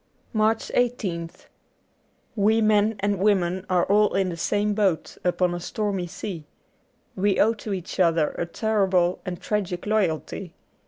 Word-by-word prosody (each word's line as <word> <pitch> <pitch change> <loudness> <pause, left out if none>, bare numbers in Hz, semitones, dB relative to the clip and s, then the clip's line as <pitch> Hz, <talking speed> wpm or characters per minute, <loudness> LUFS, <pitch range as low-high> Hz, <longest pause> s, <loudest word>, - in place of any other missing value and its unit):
'' - - -39
83 - - -3
MARCH 220 +1 +1
1 245 - +4 0.4
8th - - -24 0.9
WE 215 +1 +3
men 215 0 +3
and 200 -1 0
women 190 -2 +1
are 180 -2 +3
all 210 +1 +3
in 190 -1 +1
the 170 - -4
same 205 +5 0
boat, 195 -6 0
upon 180 0 +1
a 175 - -3
stormy 195 -1 -2
sea. 170 -3 -7 0.7
We 195 +1 +1
owe 225 +2 +4
to 215 -1 -7
each 185 0 -5
other 165 -4 +3
a 170 - -4
terrible 190 -3 +1
and 175 -2 -4
tragic 195 -4 -2
loj'alty. 190 -3 -1
195 Hz, 160 wpm, -24 LUFS, 175-210 Hz, 0.9 s, 1